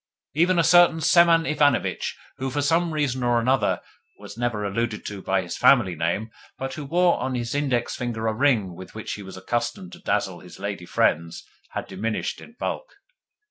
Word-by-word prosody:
Even 175 +4 +3
a 170 - +4
certain 175 0 +6
Semen 170 0 +5
Ivanovitch, 145 -3 +1 0.2
who, 135 0 -2
for 145 +2 -1
some 165 +4 +2
reason 145 -4 -1
or 120 -1 +2
another, 130 +3 +1 0.4
was 105 0 -10
never 115 -3 -2
alluded 105 +2 -2
to 100 -2 -6
by 95 0 0
his 85 - -5
family 110 -9 +5
name, 85 +7 -2 0.3
but 135 0 -4
who 145 +1 -6
wore 175 +4 +3
on 130 +1 -2
his 120 -1 -3
index 135 -5 0
finger 120 -3 -3
a 110 - +1
ring 110 -7 +2
with 95 +3 -11
which 110 - -5
he 105 - -7
was 95 -1 -9
accustomed 120 - -3
to 175 - -11
dazzle 95 - -1
his 90 - -13
lady 100 -3 -5
friends, 85 +1 0 0.3
had - - -3
diminished 105 +4 -3
in 230 - -13
bulk. - - -4
120 Hz, 185 wpm, -24 LUFS, 100-150 Hz, 0.4 s, certain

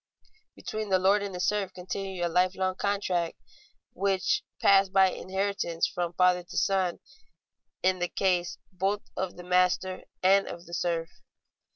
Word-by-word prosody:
Between 215 -1 -5
the 190 - +4
lord 195 +3 +3
and 200 -2 -5
the - - -5
serf 195 0 0
continued 185 0 -4
a - - +2
lifelong 185 +2 +1
contract, 185 -4 -1 0.6
which 200 - +1 0.2
passed 195 -1 +5
by 190 -1 +5
inheritance 190 -3 -1
from 175 -1 -3
father 180 0 +3
to 175 - -9
son, 190 -3 +1 0.8
in 185 0 +2
the 175 0 -1
case 180 -2 0
both 195 +3 -1
of 185 -2 -3
the 180 - -9
master 180 +1 +1 0.2
and 195 +1 +5
of 170 0 -8
the 170 - -12
serf. 170 -1 -1
185 Hz, 150 wpm, -28 LUFS, 180-195 Hz, 0.8 s, passed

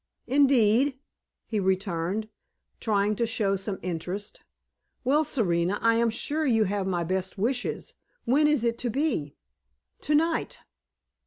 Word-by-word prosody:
"Indeed?" 265 -1 +3 0.5
he 215 - -2
returned, 190 +1 -1 0.5
trying 210 -1 +1
to 235 - +1
show 205 -3 0
some 195 0 -3
interest. 180 +4 -5 0.6
"Well, 285 +5 +3
Serena, 180 - 0
I 230 0 +3
am 235 0 +3
sure 290 +7 -2
you 230 -6 +3
have 200 -1 -1
my 175 -2 0
best 185 +3 -2
wishes. 245 +5 -2 0.3
When 290 +5 +4
is 300 -6 +2
it 235 0 0
to 245 - -1
be?" 240 - -1 0.6
"Tonight." 325 - +1
220 Hz, 130 wpm, -27 LUFS, 190-265 Hz, 0.6 s, When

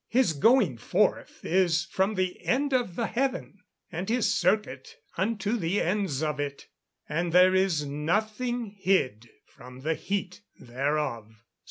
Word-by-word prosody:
[Verse: 250 -6 +3
"His - - -3
going 195 - +3
forth - - 0
is 175 -2 +2
from 190 +5 0
the 185 -1 -2
end 275 +2 +1
of 245 -9 0
the 230 - -1
heaven, 255 -5 -2 0.3
and 180 +4 -4
his 240 0 +2
circuit 210 - 0 0.2
unto 215 +2 -1
the 185 0 0
ends 175 -6 -1
of 150 -2 -2
it; 140 -1 -4 0.4
and 170 +3 -1
there 180 +2 +6
is 185 -6 +2
nothing 215 - -1
hid 125 - +1 0.2
from 125 +1 -14
the 160 +4 0
heat 185 +3 -4 0.2
thereof." 120 -4 -3
185 Hz, 145 wpm, -27 LUFS, 150-215 Hz, 0.4 s, there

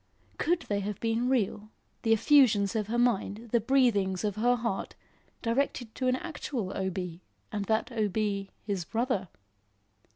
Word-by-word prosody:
Could 335 +1 +2
they 205 -1 -1
have 200 0 -4
been 230 +2 0
real, 215 -4 0 0.3
the 225 - +1
effusions 225 -5 +5
of 210 -2 0
her 235 +2 -1
mind, 235 -1 0
the 235 - +4
breathings 220 -7 +2
of 205 -2 -1
her 240 +3 +3
heart, 230 -5 -3 0.5
directed 240 -1 0
to 255 - -1
an 255 - +3
actual 260 - -4
O. 190 0 -1
B., 180 -2 -5 0.3
and 205 -2 -2
that 220 +4 0
O. 220 -3 +1
B., 200 -1 -1
his 200 -4 -2
brother? 225 -1 -1
220 Hz, 160 wpm, -29 LUFS, 200-245 Hz, 0.5 s, effusions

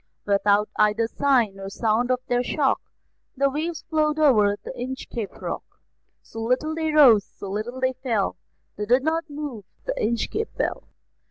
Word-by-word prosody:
Without 205 +1 +3
either 215 +2 +3
sign 235 -7 +1
or 195 0 -6
sound 225 +4 0
of 255 0 +1
their 245 0 +2
shock, 270 +2 +1 0.6
The 275 +1 +2
waves 315 +3 -3
flowed 305 -1 +1
over 215 -10 +4
the - - -6
Inchcape 245 -4 -5
Rock; - - -4 0.6
So 225 - -8
little 255 +7 0
they 320 -1 -1
rose, 255 -9 +7
so 195 - -9
little 225 +5 -4
they 260 0 +1
fell, 245 -6 -1 0.4
They 210 0 -3
did 250 +3 +4
not 325 +1 -1
move 285 -7 -6 0.2
the - - -1
Inchcape 415 - -1
Bell. - - -2
250 Hz, 160 wpm, -24 LUFS, 215-295 Hz, 0.6 s, rose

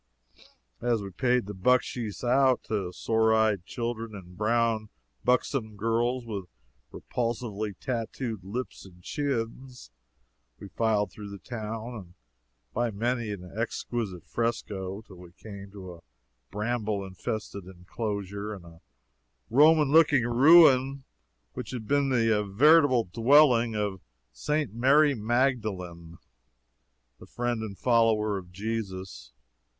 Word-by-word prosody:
As 115 -3 0
we 100 - -7
paid 125 +3 +1
the 105 - -6
bucksheesh 120 +1 0
out 130 +1 +3
to 100 -5 -3
sore 110 +3 +2
eyed 105 -5 +1
children 115 -2 -4
and 90 -2 -11
brown, 110 +1 0 0.3
buxom 125 -3 0
girls 120 +3 0
with 100 -5 -5 0.5
repulsively 115 -4 -3
tattooed 115 -3 -4
lips 120 +7 -6
and 90 -2 -16
chins, 130 -1 -4 0.7
we 100 - -10
filed 105 -3 0
through 105 -1 -9
the 100 - -8
town 115 +1 -6
and 95 -6 -10 0.6
by 120 +1 0
many 115 +2 -2
an 90 -3 -7
exquisite 110 -5 -3
fresco, 105 -4 -3
till 95 -3 -15
we 90 -1 -14
came 100 0 -10
to 95 -3 -10
a 85 - -15 0.5
bramble 105 -1 -2
infested 100 +1 -5
inclosure 100 +2 -5
and 90 -3 -13
a 85 -1 -15 0.7
Roman 150 +2 +5
looking 150 -6 +5
ruin 135 +1 +6 0.5
which - - -6
had 115 -4 -6
been 140 -1 +2
the 115 -4 +2
veritable 130 +4 +5
dwelling 120 +2 +4
of 100 -3 -2 0.3
St. 150 -7 -2
Mary 140 +5 +4
Magdalene, 105 -9 -2 1.0
the - - -13
friend 120 -2 -2
and 105 -3 -6
follower 110 -4 +2
of 90 -1 -14
Jesus. 95 -2 -5
110 Hz, 120 wpm, -27 LUFS, 100-125 Hz, 1.0 s, ruin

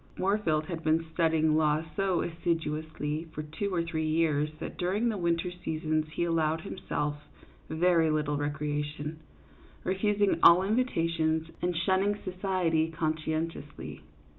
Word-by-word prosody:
Moorfield 185 -6 +1
had 165 -1 -5
been 160 +1 +2
studying 160 -2 +3
law 155 0 +2
so 195 -3 +1
assiduously 160 -2 -2
for 155 - -3
two 180 +7 -3
or 170 -2 +1
three 160 -2 -2
years 155 -2 +2
that - - -6
during 200 +7 +1
the 215 - -1
winter 170 +1 0
seasons 155 -3 -2
he 170 - 0
allowed 165 -1 +1
himself 150 -5 -3 0.5
very 165 0 +3
little 150 -1 0
recreation, 150 +1 -3 0.6
refusing 205 +1 +1
all 175 +2 +8
invitations, 165 -8 +1
and 175 -1 0
shunning 190 +4 +2
society 180 -4 0
conscientiously. 155 -1 -3
160 Hz, 125 wpm, -29 LUFS, 155-180 Hz, 0.6 s, all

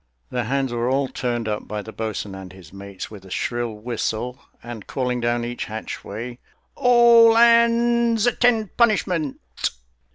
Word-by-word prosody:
The 125 -2 -2
hands 135 +1 -1
were 120 +1 -1
all 135 +1 +1
turned 120 -3 -3
up 105 -1 -3
by 105 -1 -4
the 110 - -9
boatswain 110 -3 -4
and 95 -1 -9
his 95 -3 -15
mates 100 0 -8
with 100 -3 -11
a 95 - -14
shrill 120 +4 -2
whistle, 120 +2 -3 0.2
and 120 -3 -9
calling 125 -2 -2
down 120 0 0
each 120 0 -4
hatchway, 110 +2 -7 0.3
"All 235 -2 +6
hands 235 0 +4
attend 240 -4 +2
punishment!" 185 - +1
120 Hz, 150 wpm, -22 LUFS, -, 0.3 s, All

